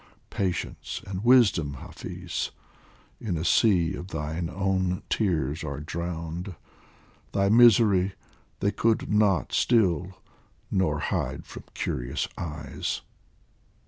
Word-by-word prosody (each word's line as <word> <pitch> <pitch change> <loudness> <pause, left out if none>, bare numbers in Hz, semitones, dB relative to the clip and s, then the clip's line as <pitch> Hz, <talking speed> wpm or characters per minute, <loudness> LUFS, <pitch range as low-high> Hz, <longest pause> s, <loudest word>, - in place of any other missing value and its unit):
Patience 90 -3 -3
and 95 0 -5
wisdom, 100 - +4
Hafiz, - - -5 0.7
in 95 -7 -2
a 80 - -3
sea 90 -2 +4
Of 90 -1 -6
thine 80 0 -3
own 95 0 0
tears 80 - 0
are 70 -2 -4
drowned; 85 +3 -5 0.8
thy 100 0 +2
misery 110 -5 +6 0.5
They 100 - +2
could 110 -1 +1
not 105 -3 +2
still 95 -5 +2 0.5
nor 95 -6 +1
hide 75 - -2
from - - -10
curious 60 +1 -2
eyes. 75 -4 -4
90 Hz, 105 wpm, -27 LUFS, 80-100 Hz, 0.8 s, misery